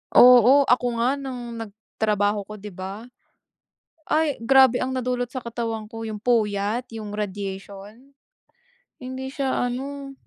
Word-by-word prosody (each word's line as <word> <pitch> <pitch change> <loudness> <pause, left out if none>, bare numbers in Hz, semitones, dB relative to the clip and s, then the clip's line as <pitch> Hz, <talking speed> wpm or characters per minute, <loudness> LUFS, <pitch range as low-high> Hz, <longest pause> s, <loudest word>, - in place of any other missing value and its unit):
oo, 250 +3 +8
ako 245 -2 +2
nga 255 +4 +1
nung 245 -4 -6
nagtrabaho 210 -1 -2
ko 210 - -8
'di 205 0 -9
ba, 190 +4 -7 1.0
ay 310 -2 +1
grabe 265 0 +6
ang 260 - -3
nadulot 250 -1 -2
sa 255 - -4
katawan 230 -2 -4
ko, 225 0 -7
yung 215 -2 -5
puyat, 215 0 0
yung 215 -2 -7
radiation, 205 +4 -7 0.9
hindi 260 +1 -6
siya 265 -3 -1
ano 275 +2 -6
235 Hz, 130 wpm, -24 LUFS, 210-255 Hz, 1.0 s, oo